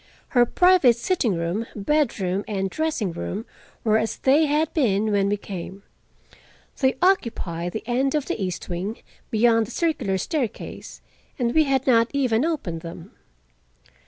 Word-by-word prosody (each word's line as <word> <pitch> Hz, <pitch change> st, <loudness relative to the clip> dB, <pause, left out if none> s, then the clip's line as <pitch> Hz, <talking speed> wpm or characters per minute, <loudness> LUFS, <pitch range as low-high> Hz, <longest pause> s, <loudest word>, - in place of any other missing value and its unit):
Her 245 Hz, -2 st, +4 dB
private 360 Hz, -9 st, +5 dB
sitting 235 Hz, -, 0 dB
room, 170 Hz, +7 st, -2 dB
bedroom 205 Hz, -6 st, 0 dB
and 195 Hz, -2 st, -2 dB
dressing 310 Hz, -, -1 dB
room 125 Hz, -, -5 dB, 0.4 s
were 220 Hz, -1 st, +3 dB
as 220 Hz, 0 st, -2 dB
they 295 Hz, +4 st, +3 dB
had 300 Hz, +2 st, +1 dB
been 215 Hz, -, +1 dB
when 200 Hz, -1 st, +2 dB
we 205 Hz, -, +1 dB
came. 195 Hz, 0 st, -8 dB, 1.0 s
They 265 Hz, -1 st, +2 dB
occupied 180 Hz, -, 0 dB
the 220 Hz, -, -4 dB
end 260 Hz, +4 st, 0 dB
of 300 Hz, -, 0 dB
the 200 Hz, -, -3 dB
east 180 Hz, -2 st, -4 dB
wing, 190 Hz, +5 st, -4 dB, 0.3 s
beyond 225 Hz, 0 st, +3 dB
the -, -, -10 dB
circular 255 Hz, -, 0 dB
staircase, 255 Hz, -, -4 dB, 0.4 s
and 240 Hz, -3 st, 0 dB
we 315 Hz, -1 st, +4 dB
had 270 Hz, -2 st, +1 dB
not 230 Hz, -3 st, +4 dB
even 255 Hz, -4 st, +2 dB
opened 270 Hz, -, -2 dB
them. 170 Hz, +2 st, -9 dB
230 Hz, 150 wpm, -24 LUFS, 195-275 Hz, 1.0 s, private